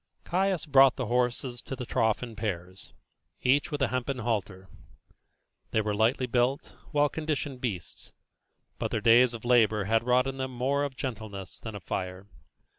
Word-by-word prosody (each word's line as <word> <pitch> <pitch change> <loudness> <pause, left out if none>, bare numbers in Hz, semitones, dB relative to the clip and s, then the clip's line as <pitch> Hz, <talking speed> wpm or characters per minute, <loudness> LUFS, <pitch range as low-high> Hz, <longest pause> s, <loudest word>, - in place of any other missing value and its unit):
Caius 190 -1 0
brought 135 -3 +6
the 130 - -3
horses 120 +1 -1
to 135 - -6
the 125 - -6
trough 110 0 +1
in 115 -2 -7
pairs, 95 -4 -5 0.5
each 140 +5 +3
with 145 -3 -1
a - - +2
hempen 130 +1 -2
halter. 105 -5 -3 1.0
They 110 - +1
were 105 -1 -1
lightly 115 +5 +2
built, 125 +3 0 0.2
well 145 0 +3
conditioned 145 -4 -3
beasts, 95 - -4 0.7
but - - -1
their - - -1
days 120 +1 +5
of 115 - -9
labour 110 -4 +4
had 110 +3 +2
wrought 125 +1 +3
in 135 0 -4
them 130 0 -2
more 135 +4 +1
of 140 -2 -6
gentleness 105 -6 -6
than 110 -2 -7
of 100 - -8
fire. 95 +1 -4
120 Hz, 170 wpm, -28 LUFS, 110-135 Hz, 1.0 s, brought